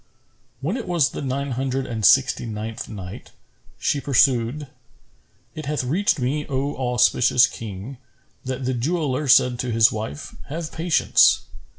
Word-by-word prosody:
When 170 - -2
it 240 - -6
was 170 -6 +2
the - - -6
Nine 140 0 -3
Hundred 130 +1 -2
and 115 -4 -5
Sixty 125 +1 +4
ninth 110 +1 -6
Night, 95 -4 -9 0.4
She 140 - -1
pursued, 130 0 +2 0.9
It 155 -2 -7
hath 150 -2 -1
reached 175 +11 +1
me, 140 +3 -1
O 140 +1 -2
auspicious 125 -1 +3
King, 110 +3 -8 0.5
that 130 0 -4
the 130 - 0
jeweller 145 +2 -1
said 125 -2 +4
to 130 -1 -2
his 115 -1 +4
wife, 105 -9 -6
"Have 160 +2 -5
patience! 160 - +3
130 Hz, 145 wpm, -22 LUFS, 120-145 Hz, 0.9 s, Sixty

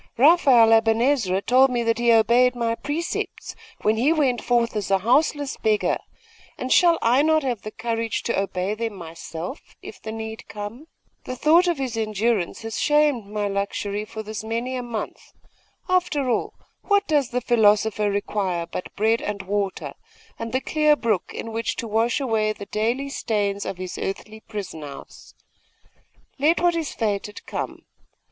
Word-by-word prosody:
Raphael 260 -6 +6
Aben 225 0 +4
Ezra 230 -8 +1
told 260 +2 +5
me 240 -2 0
that 230 0 +1
he 240 0 +4
obeyed 240 +3 +4
my 230 -1 0
precepts, 295 +8 -4 0.3
when 215 +1 +2
he 265 +7 +3
went 275 -7 +1
forth 235 -2 +1
as 205 -3 -2
a 195 - +4
houseless 280 +6 +1
beggar; 215 -1 +1 0.6
and 255 - 0
shall 345 -2 +5
I 245 +4 +4
not 315 0 +3
have 245 -5 -2 0.2
courage 230 -1 -2
to 235 - 0
obey 195 0 -2
them 225 -1 -4
myself, 170 - -8
if - - -10
the 220 - -6
need 220 0 -7
come? 210 +8 -8 0.4
The 255 - -4
thought 325 +7 +4
of 345 -3 +1
his 255 -4 -3
endurance 215 -2 -1
has 225 -1 -4
shamed 295 -7 +2
my 210 0 -2
luxury 200 +1 -2
for 220 0 -7
this 215 0 -6
many 230 +3 -3
a 250 - -2
month. 235 -3 -6 0.5
After 355 -7 +1
all, - - -1 0.3
what 405 -1 +2
does 290 -5 +2
the 250 - -1
philosopher 215 -3 +3
require 200 -4 -1
but 170 +2 -7
bread 220 +2 +2
and 205 -1 -4
water, 200 0 -2 0.5
and 230 0 -4
the 260 - 0
clear 305 0 +3
brook 225 -9 -1
in 230 - -6
which 225 0 -2
to 230 - -4
wash 225 +4 +1
away 220 -5 0
the 200 - -9
daily 235 +7 -1
stains 205 -6 -1
of 190 - -4
his 185 -1 -6
earthly 215 +3 -5
prison 200 -7 -7
house? 145 -2 -11 1.0
Let 310 +5 +3
what 350 -1 +2
is 325 -3 -2
fated 210 -1 -3
come. - - -5
225 Hz, 165 wpm, -23 LUFS, 210-260 Hz, 1.0 s, Raphael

